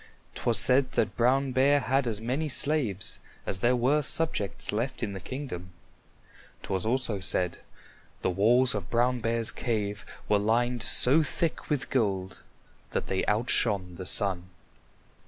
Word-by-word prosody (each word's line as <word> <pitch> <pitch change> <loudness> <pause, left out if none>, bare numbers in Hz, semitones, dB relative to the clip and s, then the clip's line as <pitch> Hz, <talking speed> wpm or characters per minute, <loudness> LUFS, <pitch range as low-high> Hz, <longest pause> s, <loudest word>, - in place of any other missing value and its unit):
'Twas 115 -3 +2
said 125 +5 +3
that - - 0
Brown 130 +3 +2
Bear 135 +3 +3
had 135 -1 0
as 110 -3 -3
many 130 +7 -2
slaves 130 - +1 0.3
as 95 - -4
there 120 +5 +2
were 130 +5 +2
subjects 150 -9 0
left 120 +4 -3
in 100 -3 -3
the 95 - -6
kingdom. 90 - -7 0.9
'Twas 95 +1 -3
also 120 -4 0
said, 90 -1 0 0.6
the - - +1
walls 120 +7 +3
of 100 -3 -5
Brown 125 +1 +1
Bear's 115 0 0
cave 105 -3 -3 0.2
were 105 - +2
lined 120 +3 0
so 140 +6 +5
thick 160 +2 -2
with 145 -3 -2
gold 95 -7 -1 0.5
that - - -3
they 95 - -2
outshone 105 -5 0
the 95 - -7
sun. 95 -3 +2
115 Hz, 145 wpm, -27 LUFS, 100-130 Hz, 0.9 s, so